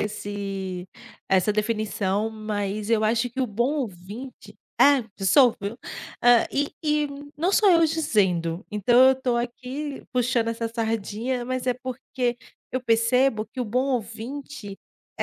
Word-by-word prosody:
esse 195 -3 -4 0.4
essa 190 +2 +3
definição, 215 -1 0
mas 210 -1 -3
eu 220 -1 +3
acho 230 +3 +1
que 260 - -4
o 260 - +1
bom 240 +6 0
ouvinte 210 +5 -9 0.2
é, 280 -4 +6 0.2
sou, 240 +5 +5
viu. 205 +4 -5 0.4
Hã, 245 -1 +6
e 285 +1 -1
e 300 -1 +2 0.3
não 345 +6 +1
só 405 -1 +5
eu 335 -2 +6
dizendo, 190 - 0
então 210 +3 +3
eu - - +5
estou 260 -2 -1
aqui 255 +4 -4
puxando 245 -2 +1
essa 230 0 -2
sardinha, 225 +2 -2
mas 255 0 -3
é 250 - +2
porque 250 -1 -3 0.4
eu 255 - 0
percebo 230 0 +2
que 250 +4 -7
o - - 0
bom 250 +4 0
ouvinte 230 -1 -6 0.4
é - - -1
230 Hz, 145 wpm, -25 LUFS, 210-255 Hz, 0.4 s, é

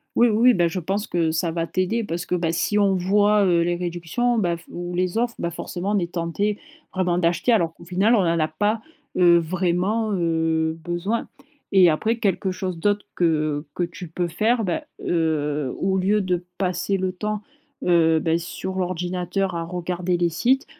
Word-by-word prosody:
Oui, 240 - +5
oui, 235 +3 +5
bah, 175 -5 +3
je 170 +3 -3
pense 195 +5 -2
que 165 -2 +1
ça 165 +1 0
va 165 0 -2
t'aider 185 +7 0
parce 175 -2 -4
que, - - -3
bah, 170 -2 0
si 205 +5 +1
on 200 -2 +3
voit, 205 +3 +3
heu, 175 -2 +3
les 175 +1 +1
réductions, 175 +8 -1
bah, 175 -4 0
f 165 - -17
ou 175 0 -5
les 180 +3 0
offres, 235 0 0
bah, 170 - -2
forcément, 175 +3 -4
on 210 - +2
est 170 -1 -3
tentés 180 +5 -1 0.4
vraiment 180 -2 +1
d'acheter. 170 +7 +1
Alors 170 -8 +2
qu'au - - -15
final, 190 +7 +3
on 205 - +3
n'en 170 -1 +1
a 155 - +2
pas, 205 +8 0 0.4
heu, 175 -1 +6
vraiment, 185 +6 0
heu, 160 -2 0
besoin 175 +7 -2 0.4
et 190 -3 +7
après 220 +9 0
quelque 195 -3 0
chose 185 -2 -4
d'autre 205 +3 +1
que 155 -3 +1
que 180 - 0
tu 170 +1 -6
peux 175 +2 -2
faire, 220 +8 +1
bah, 180 -4 -1 0.2
heu, 150 -4 0
au 190 0 0
lieu 200 +3 +2
de 180 -2 -1
passer 185 +1 0
le 185 0 -1
temps, 210 +3 -4 0.4
heu, 165 -2 +4
bah, 165 +1 +1
sur 175 +2 -5
l'ordinateur, 180 +1 -2
à 170 -1 -2
regarder 175 +1 -2
les 175 0 +2
sites, 250 - +1
180 Hz, 195 wpm, -23 LUFS, 170-200 Hz, 0.4 s, et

